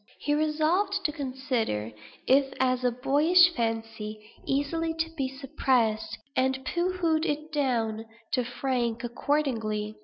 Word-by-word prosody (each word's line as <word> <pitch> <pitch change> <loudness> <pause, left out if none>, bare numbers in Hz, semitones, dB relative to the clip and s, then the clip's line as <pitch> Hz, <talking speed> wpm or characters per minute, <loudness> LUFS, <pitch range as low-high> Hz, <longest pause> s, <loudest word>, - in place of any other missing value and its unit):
He 290 - -1
resolved 315 +6 +1
to 305 - +2
consider 255 - -2 0.3
it 270 0 +3
as 255 -1 +2
a 250 - +4
boyish 300 +8 +4
fancy, 225 -3 -3 0.3
easily 320 +4 0
to 325 0 -2
be 280 -5 -2
suppressed; 260 -5 0 0.2
and 265 0 +1
pooh 360 +1 -1
poohed 320 -3 +2
it 305 0 -2
down, 230 -6 0 0.3
to 250 - +2
Frank, 240 -1 -2
accordingly. 225 -5 -1
265 Hz, 125 wpm, -28 LUFS, 235-310 Hz, 0.3 s, a